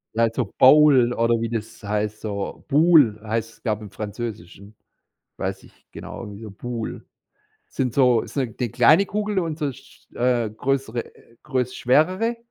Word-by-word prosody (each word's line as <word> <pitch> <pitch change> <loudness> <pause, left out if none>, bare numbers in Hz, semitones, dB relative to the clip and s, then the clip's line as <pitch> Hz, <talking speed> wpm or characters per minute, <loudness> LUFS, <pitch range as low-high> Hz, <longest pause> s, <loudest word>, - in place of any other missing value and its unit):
Also, 115 +2 +1
Bowle 130 -3 +6
oder 115 0 +2
wie 115 - -2
das 110 -1 -6
heißt, 105 +1 -2
so 100 -2 -5
Boules, 145 -7 +5
heißt 115 +1 -3
es, - - -24
glaube 110 -3 -1
ich, 105 - -8
im - - -17
Französischen 105 -2 -7 0.6
weiß - - -4
nicht - - -22
genau, - - -8
irgendwie 105 +1 -9
so 110 - -8
Boules. 115 +3 -6 0.7
Sind 125 -3 -2
so 125 -4 +4
ist - - -11
'ne 130 -5 -1
'ne 125 - -1
kleine 140 - +4
Kugel 210 0 -2
und 165 -4 -2
so 145 -4 -2
sch - - -19
äh, 120 -3 +1
größere 125 0 -2 0.4
größ 125 -2 -2
schwerere. 185 - +2
120 Hz, 165 wpm, -23 LUFS, 110-140 Hz, 0.7 s, Bowle